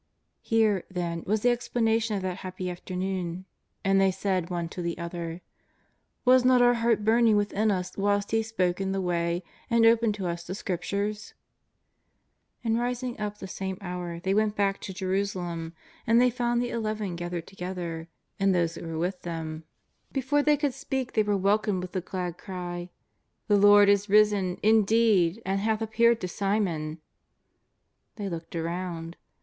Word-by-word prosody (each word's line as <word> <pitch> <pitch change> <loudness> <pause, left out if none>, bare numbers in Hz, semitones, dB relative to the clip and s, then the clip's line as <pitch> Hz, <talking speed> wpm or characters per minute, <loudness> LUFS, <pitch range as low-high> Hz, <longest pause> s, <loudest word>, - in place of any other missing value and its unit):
Here, 215 -5 +2
then, 170 -2 -3
was 215 +2 +1
the 245 - +5
explanation 225 -2 0
of 195 - -3
that 185 -1 -2
happy 185 -1 -5
after 180 +1 -7
noon. 185 -1 -3 0.4
And 195 0 +4
they 195 - +5
said 190 -2 -1
one 175 -2 -2
to 180 - -6
the 170 -1 -3
other: 170 0 -5 0.4
" - - -45
Was 255 0 +6
not 255 0 +5
our 245 0 +6
heart 230 -3 +1
burning 225 0 +5
within 205 +1 +1
us 185 -3 -2
whilst 205 0 0
He 225 0 +3
spoke 195 -5 -1
in 190 0 -1
the 195 - -1
way 175 -1 -1 0.3
and 235 -1 +4
opened 225 -2 +4
to 195 -3 -4
us 170 0 -3
the 180 +2 -5
Scriptures? 200 +3 -3
'^ - - -47 1.2
And 225 0 +1
rising 245 0 -3
up 210 -1 -3
the 190 - -7
same 190 0 -4
hour, 180 -2 -5
they 190 +3 0
went 215 0 +2
back 195 -1 0
to - - -6
Jerusalem, 185 -3 -2 0.3
and 230 +1 +5
they 250 0 +4
found 240 0 0
the 245 - -3
Eleven 215 -5 -2
gathered 175 -1 -4
to 195 - -16
gether, 175 -3 -5 0.3
and 195 -1 +3
those 170 -2 +1
that 170 - -8
were 165 -1 -5
mth 180 +3 -2
them. 160 -2 -5 0.5
Before 275 +2 +1
they 295 0 +3
could 285 -2 0
speak 265 -2 -3
they 220 - +3
were 205 -1 +1
welcomed 200 -1 +1
with 180 - -6
the 185 - -2
glad 180 -1 -4
cry: 175 -2 -6 0.3
" - - -49
The 205 - +5
Lord 205 0 +7
is 200 0 +3
risen, 205 -3 +4
indeed, 220 -3 +4
and 195 +1 0
hath 215 +1 0
appeared 230 +1 +3
to 185 - -2
Simon 180 -6 -1
!'^ - - -23 1.2
They 205 -2 -4
looked 165 -1 -7
around. 170 0 -4
195 Hz, 180 wpm, -27 LUFS, 180-220 Hz, 1.2 s, Lord